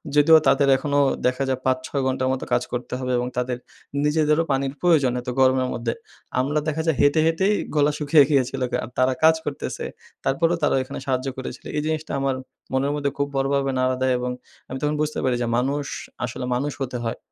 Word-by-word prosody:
যদিও 160 +2 +7
তাদের 140 -2 +4
এখনো 145 +1 0 0.3
দেখা 130 +2 0
যায় 130 -1 0
৫-৬ 130 +2 0
ঘণ্টা 130 0 -1
মতো 130 - -2
কাজ 120 - +2
করতে 125 +1 -4
হবে 125 -1 -2
এবং 125 0 -1
তাদের 125 0 -1 0.5
নিজেদেরও 150 +1 +3
পানির 135 0 0
প্রয়োজন, 155 -8 +4
এত 125 - -6
গরমের 130 -1 +4
মধ্যে 115 -1 -2 0.5
আমরা 145 +4 +1
দেখা 155 +1 0
যায়, 160 - +2
হেঁটে, 145 +2 +4
হেঁটেই 190 +6 +2 0.2
গলা 145 0 +4
শুকিয়ে 150 0 +5
গিয়েছিলো 130 -2 +1 0.2
আর - - -7
তারা 130 0 +3
কাজ 160 0 +7
করতেছে 145 - -4 0.4
তারপরেও 165 +5 +1
তারা - - +3
এখানে - - -7
সাহায্য 130 0 -1
করেছিলো, 130 - -7
এই - - +1
জিনিসটা 155 0 -2
আমার 135 -1 0 0.4
মনের 135 +2 +1
মধ্যে 140 -1 -1
খুব 140 0 0
বড়োভাবে 135 0 +1
নাড়া 130 0 +2
দেয় 130 -1 +3
এবং 125 0 -2 0.4
আমি 130 - -4
তখন 150 0 0
বুঝতে 155 0 -1
পারি 130 -2 +2
যে, 120 - 0
মানুষ 140 +3 0 0.4
আসলে 125 +2 -5
মানুষ 140 +3 -1
হতে 125 -2 -2
হয়, 115 - -2
135 Hz, 195 wpm, -23 LUFS, 130-150 Hz, 0.5 s, যদিও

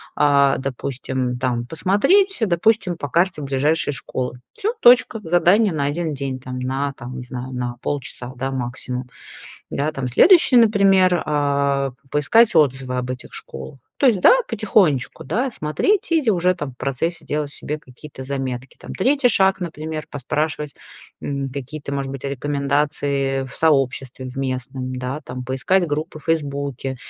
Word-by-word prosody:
а, 140 -1 +4
допустим, 130 -1 -3
там 120 -1 -1
посмотреть, 260 - +2
э, 220 - +3
допустим, 180 0 +2
по 145 - -4
карте 170 +1 +1
ближайшие 145 +2 +1
школы. 125 -1 -4
Всё, 435 +1 -2
точка. 240 -1 +6
Задание 180 +5 +4
на 145 -3 -1
1 155 +1 -2
день 135 -1 -4
там, 125 0 -7
на, 135 +2 -2
там, 125 -1 -8
не 125 - -6
знаю, 125 +1 -7
на 125 -1 -3
полчаса, 130 -3 -4
да, 135 +1 -3
максимум. 125 0 -4 0.6
Да, 150 +2 -1
там, 135 -4 -4
следующий, 325 - +6
например, 195 -6 +5
а, 140 -2 +1 0.2
поискать 195 - +3
отзывы 130 -4 +2
об 125 0 -3
этих 125 - -8
школах. 65 - -9 0.2
То - - +2
есть, 210 -7 +3
да, - - +8
потихонечку, 195 - +1
да, 245 - 0
смотреть, 335 - 0
и 325 - +4
зи 250 - +1
уже 180 -1 +2
там 145 -6 -5
в 125 - -21
процессе 155 +6 -2
делать 150 0 -2
себе 150 +1 -5
какие-то 130 0 -12
заметки. 130 -1 -4
Там - - -8
3 270 +6 +3
шаг, 195 -4 +3
например, 155 -3 -5
поспрашивать, 150 +2 -2 0.5
м, 140 -1 -3
какие-то, 140 +2 -7
может 140 -1 -2
быть, 135 0 -7
а, 140 - -2
рекомендации 140 -1 -1
в 130 - -10
сообществе 135 -4 +1
в 130 +1 -8
местном, 130 -1 -3
да, 125 +3 -4
там. 125 0 -6
Поискать 135 +9 +1
группы 155 +2 -3
в 155 - -14
"Фейсбуке" 140 -4 -2
140 Hz, 160 wpm, -21 LUFS, 130-175 Hz, 0.6 s, да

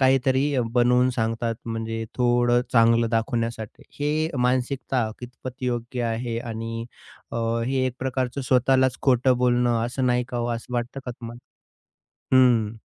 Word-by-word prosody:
काहीतरी 135 +1 +3 0.2
बनवून 125 +1 +4
सांगतात. 115 0 -1
म्हणजे 115 0 -3
थोडं 120 0 +3
चांगलं 115 -1 +4
दाखवण्यासाठी. 115 -1 -2 0.2
हे 155 +2 +1
मानसिकता 125 -2 0
कितपत 125 +1 -9
योग्य 120 0 -2
आहे? 115 0 -2
आणि 115 0 -5 0.5
अ, - - -3 0.3
हे 135 +2 -1
एक 125 - -3
प्रकारचं 130 0 -2
स्वतःलाच 130 0 +2
खोटं 130 -1 +3
बोलणं 120 -1 +2
असं, 130 +1 -2
नाही 125 0 +2
का 125 - -5
हो? 120 0 -1
असं 115 +2 -11
वाटतं 120 +3 -3
का 125 - -2
तुम्हाला? 120 0 -9 1.0
हं. 115 -4 +4
120 Hz, 135 wpm, -24 LUFS, 115-130 Hz, 1.0 s, बनवून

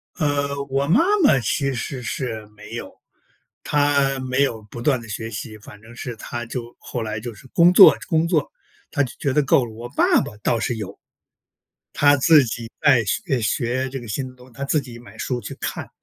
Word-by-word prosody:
呃， 140 -3 -1
我 135 +1 0
妈 185 - +5 0.2
妈 140 - +5
其 135 +3 0
实 125 +2 -4
是 115 -2 -4
没 105 0 -13
有， - - -6 0.7
她 140 -2 +2
没 130 +1 0
有 115 -5 -2
不 120 - -7
断 130 0 +2
地 115 - -11
学 110 +1 -5
习， 110 0 -7
反 105 0 -13
正 115 +2 -14
是 120 0 -6
她 120 +2 -6
就 120 0 -7
后 120 - -5
来 110 -1 -4
就 120 +1 -7
是 135 - -15
工 170 +1 +5
作 190 +2 +9
工 165 -2 +2
作， 160 -5 0 0.4
她 145 - +1
就 125 - -5
觉 140 - 0
得 150 - +3
够 130 -1 +3
了。 115 - -9
我 120 +2 -8
爸 - - +3
爸 105 - -7
倒 115 +2 0
是 120 - -1
有， 100 -2 -7 1.0
他 145 0 +4
自 150 +2 +6
己 115 0 -5
在 135 -7 +5
学 100 - -1
诶， 125 - 0
学 120 +4 -1
这 135 0 -5
个 120 - -10
新 130 +5 -3
的 130 - -14
东 125 0 -17
西， - - -21
他 140 - -5
自 150 +2 +1
己 125 -3 -10
买 120 - -15
书 125 -2 -2
去 - - -7
看， - - -4
130 Hz, 230 characters per minute, -22 LUFS, 115-140 Hz, 1.0 s, 作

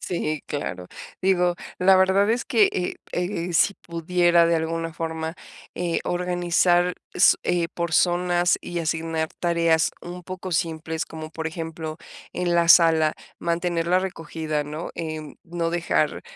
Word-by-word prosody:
Sí, 155 -4 -2
claro, 90 -11 -4 0.4
digo, 180 -2 +3 0.2
la 190 +1 +6
verdad 190 +2 +4
es 235 +1 0
que, 220 -4 +4
eh 180 -1 -2 0.2
eh 175 -1 -2
eh, - - -4
si 200 +4 +3
pudiera 170 0 +2
de 170 0 +2
alguna 165 0 -2
forma, 160 0 -4 0.4
eh, 175 -1 -1
organizar 175 0 +2 0.2
s - - +5
eh, 175 -1 +1
por 170 -2 -3
zonas 175 0 +2
y 175 -1 -4
asignar 160 0 -1
tareas 170 -2 +2
un 175 +1 -8
poco 185 0 -6
simples, 160 -1 -2
como 155 -1 -8
por 160 0 -5
ejemplo, 160 -1 -5 0.4
en 175 -1 -1
la 170 0 +3
sala, 160 -3 +6 0.3
mantener 170 0 -1
la 180 +1 +3
recogida, 160 -4 -3
¿no?, 150 +3 -6
eh, 155 -2 -5
no 170 -1 -2
dejar 170 0 0
170 Hz, 145 wpm, -24 LUFS, 160-180 Hz, 0.4 s, la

